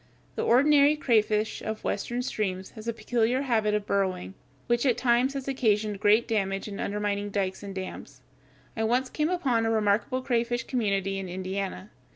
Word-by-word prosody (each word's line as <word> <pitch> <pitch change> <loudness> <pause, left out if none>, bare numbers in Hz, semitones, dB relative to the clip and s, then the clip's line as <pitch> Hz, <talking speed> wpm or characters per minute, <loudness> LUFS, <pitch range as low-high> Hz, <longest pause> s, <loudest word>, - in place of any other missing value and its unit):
The - - -3
ordinary 285 +4 +5
crayfish 220 -6 +1
of 220 0 -5
Western 245 +1 -2
streams 190 -6 -3
has 220 -1 -10
a - - +1
peculiar 240 +3 0
habit 220 -5 +1
of 210 -1 -2
burrowing, 185 - -1 0.3
which 240 0 +1
at 255 -4 +2
times 250 +2 +2
has 275 -1 -4
occasioned 215 -6 +1
great 210 +3 +4
damage 195 -3 -1
in 200 -1 -7
undermining 205 0 -2
dikes 195 -2 -2
and 200 -1 -7
dams. 140 -8 -7 0.5
I 220 - -1
once 250 +3 +1
came 305 +1 0
upon 270 -11 +1
a 225 - +1
remarkable 220 +4 +1
crayfish 240 -1 0
community 195 -6 -1
in 190 -1 -6
Indiana. 190 +2 -4
220 Hz, 170 wpm, -27 LUFS, 200-245 Hz, 0.5 s, ordinary